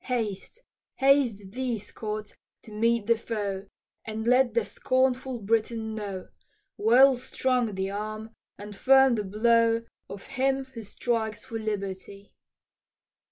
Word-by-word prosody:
"Haste, 235 Hz, -, -3 dB, 0.3 s
haste 255 Hz, -8 st, +2 dB
thee, 250 Hz, 0 st, -2 dB
Scott, 210 Hz, 0 st, -6 dB, 0.3 s
to 220 Hz, -, -13 dB
meet 230 Hz, +1 st, +1 dB
the 230 Hz, +2 st, +4 dB
foe, 205 Hz, -4 st, -4 dB, 0.4 s
And 220 Hz, 0 st, -5 dB
let 250 Hz, -1 st, +3 dB
the 235 Hz, -3 st, +2 dB
scornful 260 Hz, 0 st, 0 dB
Briton 220 Hz, +1 st, -1 dB
know, 200 Hz, -3 st, -6 dB, 0.5 s
Well 255 Hz, +5 st, +6 dB
strung 250 Hz, -3 st, -1 dB
the 190 Hz, +1 st, -2 dB
arm 215 Hz, +2 st, -5 dB, 0.3 s
and 205 Hz, +1 st, -9 dB
firm 265 Hz, +3 st, +5 dB
the 215 Hz, -3 st, -1 dB
blow 230 Hz, +3 st, +3 dB, 0.3 s
Of 200 Hz, -, -8 dB
him 270 Hz, 0 st, 0 dB
who 260 Hz, -3 st, -10 dB
strikes 220 Hz, +1 st, -2 dB
for 230 Hz, -3 st, -5 dB
liberty." 200 Hz, -1 st, -5 dB
225 Hz, 125 wpm, -27 LUFS, 210-250 Hz, 0.5 s, Well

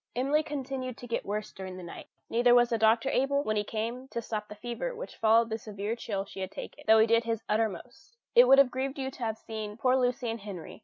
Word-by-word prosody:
Emily 275 Hz, +5 st, +2 dB
continued 265 Hz, -4 st, -5 dB
to -, -, -9 dB
get 230 Hz, -4 st, -3 dB
worse 210 Hz, +1 st, -3 dB
during 185 Hz, -1 st, -7 dB
the 185 Hz, -, -8 dB
night: 170 Hz, -, -9 dB, 0.2 s
neither 240 Hz, +1 st, +4 dB
was 240 Hz, 0 st, +5 dB
the 230 Hz, -, +1 dB
doctor 225 Hz, +3 st, +4 dB
able, 280 Hz, +2 st, +1 dB
when 215 Hz, -4 st, -1 dB
he 210 Hz, -, +1 dB
came, 230 Hz, +5 st, -4 dB
to 235 Hz, -, -4 dB
stop 215 Hz, -2 st, -4 dB
the 210 Hz, -, -9 dB
fever 240 Hz, -, -4 dB
which -, -, -8 dB
followed 225 Hz, +1 st, +3 dB
the 220 Hz, -, -2 dB
severe 210 Hz, +1 st, -4 dB
chill 200 Hz, -4 st, -3 dB
she 195 Hz, -, -10 dB
had 190 Hz, -1 st, -3 dB
taken, -, -, -9 dB
though 220 Hz, 0 st, +7 dB
he 220 Hz, -, +6 dB
did 230 Hz, +1 st, +3 dB
his 230 Hz, -1 st, -2 dB
uttermost. 225 Hz, -, -3 dB, 0.2 s
It -, -, +8 dB
would 270 Hz, -, +8 dB
have 275 Hz, -2 st, +6 dB
grieved 265 Hz, +2 st, -3 dB
you 265 Hz, -1 st, -3 dB
to 270 Hz, -, -15 dB
have 220 Hz, -1 st, -2 dB
seen 215 Hz, -2 st, -6 dB
poor 255 Hz, +2 st, +3 dB
Lucy 250 Hz, -1 st, 0 dB
and 230 Hz, -, -5 dB
Henry. 195 Hz, -5 st, -8 dB
230 Hz, 250 wpm, -29 LUFS, 215-260 Hz, 0.2 s, It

